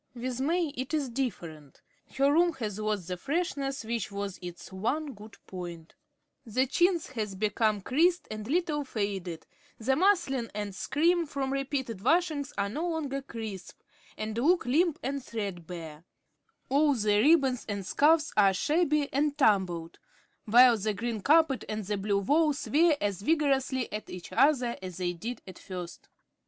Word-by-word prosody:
With 250 +1 -4
May 330 +3 +1
it 275 +2 -4
is 285 -4 -1
different. 170 - -5 0.4
Her 275 +1 +4
room 340 +2 +4
has 215 -7 -4
lost 210 -4 -2
the 180 -1 -3
freshness 275 - -2
which 230 -2 -3
was 200 -1 -5
its 175 +1 -9
one 275 +10 -2
good 210 -1 -13
point. 175 -3 -8 0.5
The 255 +4 +1
chintz 345 +3 +1
has 215 -6 -3
become 215 +1 +1
creased 340 - +2
and 215 0 -6
a - - -9
little 310 -2 0
faded, 200 - -4 0.3
the 260 +4 +1
muslin 325 - +2
and 205 -1 -3
scrim 335 - +1
from 275 -2 -2
repeated 270 -6 -3
washings 310 -1 +1
are 200 0 +1
no 310 +12 -3
longer 285 -4 -2
crisp, 220 -7 -8 0.4
and 215 0 -4
look 315 +7 +2
limp 315 +6 +2
and 275 +1 -3
threadbare; 175 -8 -6 0.6
all 285 +1 +3
the 210 -3 +2
ribbons 275 -3 +4
and 200 -2 -3
scarfs 300 - +3
are 195 -2 +5
shabby 300 - +1
and 290 +1 +1
tumbled; 185 - +1 0.5
while 240 +1 +7
the 210 +1 -1
green 230 0 -3
carpet 300 +1 +4
and 215 -1 -3
the 205 +1 -2
blue 200 0 0
wall 300 +8 +3
"swear" 300 +3 +2
as 200 -2 -2
vigorously 270 -3 +1
at 210 - -5
each 180 -1 -8
other 255 -5 +3
as 185 -2 -7
they 180 -1 -1
did 230 +9 -6
at 185 -2 -11
first. 180 -3 -8
245 Hz, 160 wpm, -29 LUFS, 200-290 Hz, 0.6 s, while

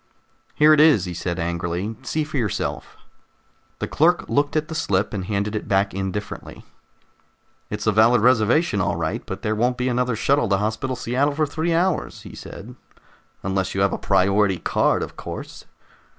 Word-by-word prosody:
"Here 155 +1 +6
it 155 - +4
is," 150 - +5
he 90 - -5
said 85 0 -3
angrily. 85 +4 -3
"See 155 +4 -2
for 150 -1 -5
yourself." 110 -6 -3 0.8
The - - -3
clerk 170 +4 +2
looked 145 +1 0
at 155 0 0
the 160 - -6
slip 100 -11 0
and 95 -3 -3
handed 105 +1 -2
it 105 - -4
back 100 0 +1
indifferently. 95 +2 -5 1.0
"It's 105 0 -4
a 110 - +4
valid 110 +3 +5
reservation, 120 - +3
all 85 -1 0
right, 80 -1 -3
but - - -7
there 110 - 0
won't 120 +3 0
be 125 +1 0
another 125 -1 0
shuttle 135 +1 +1
to 100 - +3
Hospital 110 +6 -2
Seattle 135 +5 0
for 155 +1 +2
three 160 +3 -1
hours," 180 +1 -1
he - - -10
said, - - -10 0.7
"unless 95 0 -1
you 95 - 0
have 100 -1 +2
a - - -3
priority 100 0 +2
card, - - +1
of - - -8
course." - - -8
110 Hz, 180 wpm, -22 LUFS, 95-140 Hz, 1.0 s, Here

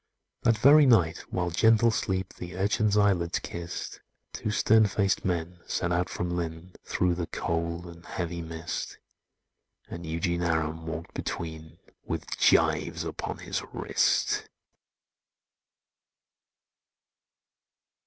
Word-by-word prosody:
That 115 -2 +3
very 140 +5 +7
night 85 -9 +4
while 90 -1 -1
gentle 115 +5 +4
sleep 95 -3 -2
The 90 0 -8
urchin's 105 +2 +2
eyelids 95 -5 +2
kissed, 85 0 -6 0.3
Two - - -3
stern 110 +1 +4
faced 100 0 +1
men 90 -1 -2
set 85 - -1
out 90 +1 +1
from 90 0 -3
Lynn, 85 +1 -5
Through 90 -1 +1
the 85 -1 -3
cold 85 +1 -2
and 85 0 -11
heavy 85 -1 -4
mist; 80 0 -5 0.9
And 85 - -7
Eugene 85 +2 -1
Aram 80 -1 -1
walked 80 +1 -5
between, 80 -1 -5 0.3
With - - -4
gyves - - +3
upon - - -4
his - - -2
wrist. - - +1
85 Hz, 115 wpm, -28 LUFS, 85-95 Hz, 0.9 s, very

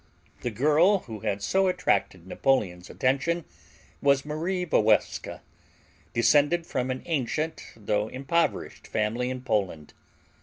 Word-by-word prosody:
The 120 - -1
girl 155 - +3
who 110 -3 -8
had 100 -1 -2
so 190 - +2
attracted 95 - 0
Napoleon's 95 -5 0
attention 140 +6 0 0.6
was 140 0 +3
Marie 170 +5 -2
Walewska, 110 -9 +1 0.7
descended 145 +8 +3
from 130 -4 -2
an 130 0 -3
ancient 155 +1 -2
though 105 -1 -1
impoverished 135 +8 -1
family 115 +4 -1
in 130 0 -4
Poland. 95 - -2
130 Hz, 115 wpm, -27 LUFS, 110-160 Hz, 0.7 s, girl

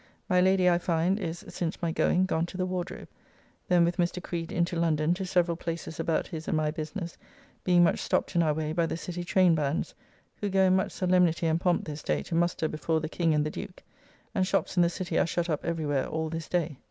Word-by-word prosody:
My 180 0 +3
Lady, 190 0 +4
I 175 -1 +4
find, 175 +3 +1
is, 170 -3 -5
since 165 -2 -3
my 170 -1 -1
going, 180 +2 +2
gone 170 -2 0
to 180 - -8
the 185 - 0
Wardrobe. 180 0 -4 0.6
Then 175 -2 +4
with 175 +1 -1
Mr. 175 0 0
Creed 165 -2 -4
into 170 +1 0
London, 165 -1 +2
to 185 +1 -4
several 175 -2 +2
places 165 -1 -5
about 165 0 0
his 160 -1 -7
and 175 - +1
my 155 -1 +1
business, 165 +2 -5 0.5
being 175 -1 +5
much 170 - +3
stopped - - -1
in 170 - +4
our 155 -2 +2
way 155 0 -2
by 170 0 +1
the - - -3
City 175 +1 -5
traynebands, 165 -5 +2 0.4
who 205 - -2
go 190 0 +3
in 185 0 +4
much 190 - 0
solemnity 180 -2 +2
and 160 +1 +1
pomp 175 -2 +1
this 150 -1 -6
day 75 -2 -1
to - - -7
muster 170 -1 +1
before 160 +1 -1
the 155 0 -4
King 165 -2 +1
and 150 0 +2
the 155 - -2
Duke, 180 - -8 0.5
and 185 -1 +1
shops - - 0
in 175 - +4
the 170 - +4
City 175 -1 -2
are - - +2
shut 170 0 -1
up 150 - -2
every 165 -2 -2
where 145 -2 0
all 160 0 -2
this 165 0 -5
day. 165 -6 -1
170 Hz, 235 wpm, -28 LUFS, 160-180 Hz, 0.6 s, being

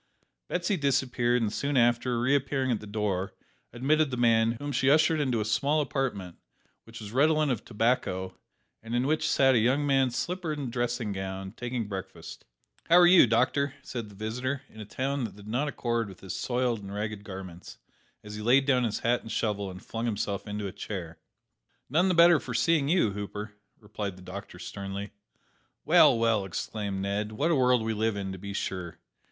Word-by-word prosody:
Betsy 180 +2 -1
disappeared, 125 -4 +1
and 105 -1 -1
soon 140 -1 -1
after, 120 0 +2
reappearing 135 +1 +1
at 115 - 0
the 105 - -10
door, 100 -3 -2 0.4
admitted 150 +5 +2
the 125 - -4
man, 115 -1 +3
whom 145 +5 -5
she 135 0 +2
ushered 155 +2 +4
into 130 -6 0
a 105 - -1
small 140 +8 +1
apartment, 125 - -2 0.5
which 115 +1 -11
was 105 -2 -8
redolent 150 +3 +3
of 120 - -2
tobacco, 105 -5 -1 0.5
and 115 +2 -5
in 125 +1 +1
which 155 +2 +1
sat 135 -1 +4
a 120 - +4
young 130 +6 +2
man 135 -2 +3
slippered 155 +6 -3
and 135 -4 -4
dressing 120 -2 -2
gowned, 95 +1 -5
taking 120 -3 -3
breakfast. 95 -2 -8 0.4
"How 170 - +4
are 175 0 +8
you, 175 -6 +7
doctor?" 130 +4 +1
said 115 -4 -6
the 100 - -14
visitor, 125 +6 -3
in 110 - -15
a - - -7
tone 135 +5 -2
that 110 - -8
did 105 0 -13
not 125 +7 -1
accord 120 -5 -2
with 95 - -13
his 95 -2 -6
soiled 120 -3 -1
and 100 0 -8
ragged 105 0 -4
garments, 95 -3 -9 0.5
as 105 0 -9
he 105 - -6
laid 130 +5 +4
down 130 -3 +3
his 110 - -2
hat 120 +1 +1
and 110 - -9
shovel, 100 -3 -1
and 95 0 -10
flung 115 +1 -3
himself 100 -2 -3
into 105 0 -4
a 95 - -4
chair. 85 -5 -7 0.7
"None 175 +6 +3
the 185 - +2
better 170 -1 +7
for 125 -2 -6
seeing 140 +4 +2
you, 165 - +3
Hooper," 105 +1 -6 0.3
replied 105 -2 -5
the 90 - -14
doctor 100 +3 -8
sternly. 100 0 -6 0.7
"Well, - - +6
well!" 115 -3 +2
exclaimed 95 +1 -4
Ned, 105 +2 -2
"what 150 +10 0
a - - +4
world 125 -3 +3
we 110 0 -1
live 110 0 0
in, 100 -1 -4
to 95 - -7
be 100 +1 -6
sure! 90 -4 -4
115 Hz, 195 wpm, -28 LUFS, 105-135 Hz, 0.7 s, are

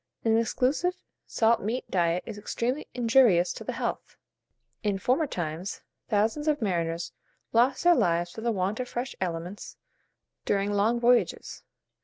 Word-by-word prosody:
An 225 -1 +4
exclusive 260 +10 +1 0.3
salt 230 0 +2
meat 230 +5 -2
diet 175 -1 +1
is 205 - -7
extremely 245 +7 -2
injurious 230 -7 +4
to - - -8
the - - -4
health; - - -4 0.7
and, 205 -1 +1
in - - -2
former 260 - +1
times, 175 - -4 0.3
thousands 225 +8 +1
of 300 -1 +2
mariners 170 -5 -2 0.4
lost 250 +3 +3
their 350 0 +7
lives 175 - +1
for 220 - -8
the 235 +1 0
want 195 +2 -1
of 250 - -3
fresh 245 +2 -4
aliments 175 +2 -5 0.7
during 200 0 0
long 215 +4 +2
voyages. 240 0 +1
220 Hz, 150 wpm, -27 LUFS, 180-245 Hz, 0.7 s, their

